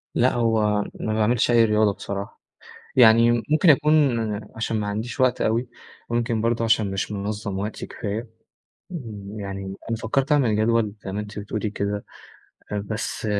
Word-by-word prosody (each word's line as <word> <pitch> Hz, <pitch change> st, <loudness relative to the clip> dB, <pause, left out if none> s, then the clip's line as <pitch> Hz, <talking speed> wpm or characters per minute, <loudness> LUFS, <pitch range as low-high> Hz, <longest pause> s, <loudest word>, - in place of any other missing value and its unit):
لأ 125 Hz, +2 st, +3 dB
هو 110 Hz, -3 st, +2 dB, 0.2 s
ما 110 Hz, -, -2 dB
باعملش 110 Hz, +2 st, +2 dB
أي 115 Hz, -1 st, +6 dB
رياضة 105 Hz, -1 st, +3 dB
بصراحة، 100 Hz, 0 st, -6 dB, 0.6 s
يعني 115 Hz, -1 st, +7 dB, 0.2 s
ممكن 155 Hz, +3 st, +5 dB
أكون 145 Hz, -4 st, +4 dB, 0.4 s
عشان 110 Hz, -1 st, -1 dB
ما 105 Hz, -, -2 dB
عنديش 110 Hz, +6 st, -4 dB
وقت 130 Hz, -1 st, +3 dB
أوي، 115 Hz, +3 st, +1 dB, 0.4 s
وممكن 120 Hz, -1 st, 0 dB
برضه 115 Hz, +1 st, +1 dB
عشان 110 Hz, -3 st, +2 dB
مش 95 Hz, +2 st, -3 dB
منظم 100 Hz, 0 st, -3 dB
وقتي 105 Hz, +2 st, -4 dB
كفاية، 110 Hz, +2 st, -5 dB, 1.1 s
يعني 95 Hz, -1 st, -5 dB, 0.2 s
أنا 115 Hz, -, 0 dB
فكرت 130 Hz, +6 st, 0 dB
أعمل 125 Hz, -8 st, +3 dB
جدول 110 Hz, -1 st, +2 dB
زي 95 Hz, -, -5 dB
ما 105 Hz, -, -2 dB
أنتِ 105 Hz, 0 st, -7 dB
بتقولي 105 Hz, +1 st, -3 dB
كده، 100 Hz, 0 st, -3 dB, 0.8 s
بس 110 Hz, +3 st, -4 dB
110 Hz, 150 wpm, -24 LUFS, 105-120 Hz, 1.1 s, يعني